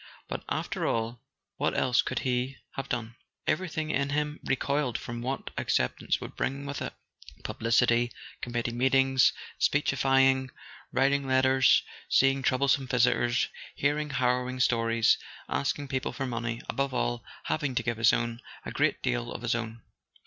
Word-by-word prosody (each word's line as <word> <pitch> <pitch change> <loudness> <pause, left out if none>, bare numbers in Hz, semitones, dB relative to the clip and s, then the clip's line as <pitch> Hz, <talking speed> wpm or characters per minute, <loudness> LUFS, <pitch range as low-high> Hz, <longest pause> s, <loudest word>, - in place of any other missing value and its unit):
But, - - -5
after - - -2
all, 115 +1 -1 0.4
what - - 0
else 125 -1 +3
could - - -2
he 125 +1 0
have 135 0 -6
done? 115 -1 -3 0.3
Everything 160 -3 -1
in 140 -1 0
him 150 +1 -1
recoiled 135 -2 0
from 120 0 -6
what 130 +3 -3
acceptance 60 - 0
would - - -8
bring 140 +1 -2
with 140 -1 -4
it: - - -4 0.5
publicity, 120 +1 +2 0.3
committee 120 -1 -2
meetings, 130 +2 +4 0.3
speechifying, 135 -2 +3 0.4
writing 140 +1 +2
letters, 130 0 +4 0.3
seeing 135 0 +4
troublesome 135 0 +2
visitors, 125 -1 +2 0.3
hearing 150 +2 0
harrow¬ 125 -1 +1
ing 130 0 -5
stories, 115 -2 +3 0.3
asking 140 +1 -1
people 130 -1 -2
for 135 - -3
money—above 120 +2 -2
all, 120 -1 -1 0.2
hav¬ 155 - 0
ing 135 -4 -2
to - - +1
give 115 -2 -1
his 115 0 +5
own; 120 0 -1 0.2
a - - -4
great 145 0 +1
deal 120 -2 -1
of 120 - -7
his 120 - +1
own. 115 -1 -4
130 Hz, 150 wpm, -28 LUFS, 120-135 Hz, 0.5 s, his